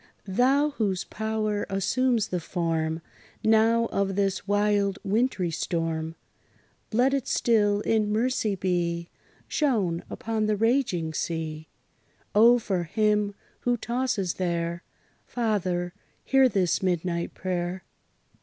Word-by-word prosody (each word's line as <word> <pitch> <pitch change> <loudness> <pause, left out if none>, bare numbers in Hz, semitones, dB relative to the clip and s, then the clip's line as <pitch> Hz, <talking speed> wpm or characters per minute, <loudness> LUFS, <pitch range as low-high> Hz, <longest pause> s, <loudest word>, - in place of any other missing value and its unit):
Thou, 265 +9 +3
whose 200 -8 -1
power 215 -1 -2
assumes 225 +4 +1
the 180 - -1
form, 165 -1 -2 0.4
Now, 225 +1 +4
of 195 -1 0
this 195 -1 0
wild 205 -1 +2
wintry 205 -4 0
storm, 165 -1 -2 0.8
Let 250 +4 +3
it 275 -2 -1
still 205 -3 +2
in 215 -2 +1
mercy 220 -2 +1
be 175 -2 -1 0.4
Shown 205 - 0
upon 220 -1 -2
the 215 - +2
raging 220 -8 +1
sea! 155 -1 -3 0.7
O! 235 +3 +7
for 190 -6 -2
him, 210 +2 +1 0.2
who 245 0 0
tosses 235 -6 -1
there, 170 -1 -2 0.5
Father, 185 -7 -1 0.3
hear 270 -1 +4
this 185 -4 +1
midnight 175 -2 -1
prayer! 180 0 -3
200 Hz, 110 wpm, -26 LUFS, 175-225 Hz, 0.8 s, O